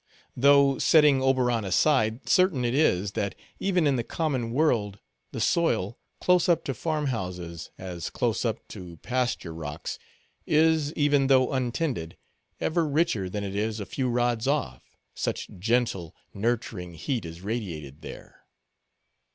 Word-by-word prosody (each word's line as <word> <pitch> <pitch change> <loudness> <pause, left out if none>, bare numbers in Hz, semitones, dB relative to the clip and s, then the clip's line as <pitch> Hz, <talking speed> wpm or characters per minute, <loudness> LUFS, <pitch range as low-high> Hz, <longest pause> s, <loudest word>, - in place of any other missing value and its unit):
Though 140 +1 +5
setting 150 -4 +5
Oberon 125 -4 +2
aside, 110 +3 +2
certain 180 -9 +3
it 120 - 0
is, 100 - +2
that, 100 -3 -2 0.2
even 180 -4 +1
in 140 -3 +3
the 120 - -1
common 130 -5 -2
world, 115 -8 +1 0.3
the - - -5
soil, 120 - +1 0.2
close 180 -1 +3
up 170 -2 +3
to 135 - -2
farm 155 +4 -2
houses, 90 - -4
as 90 -2 -5
close - - -1
up - - -3
to 85 -2 -9
pasture 125 -9 -1
rocks, 75 -2 -6 0.5
is, 155 -1 +3
even 145 -2 +3
though 130 -1 +4
untended, 125 - -2 0.4
ever 160 0 +1
richer 145 - +1
than 105 +2 -4
it 100 -1 -4
is 110 +1 -1
a 100 - -4
few 130 +3 -2
rods 120 0 0
off—such 65 - -3
gentle, 110 -6 0 0.2
nurturing 100 -5 -2
heat 120 - -2
is 85 +1 -8
radiated 85 - -5
there. - - -11
120 Hz, 140 wpm, -27 LUFS, 95-145 Hz, 0.5 s, Though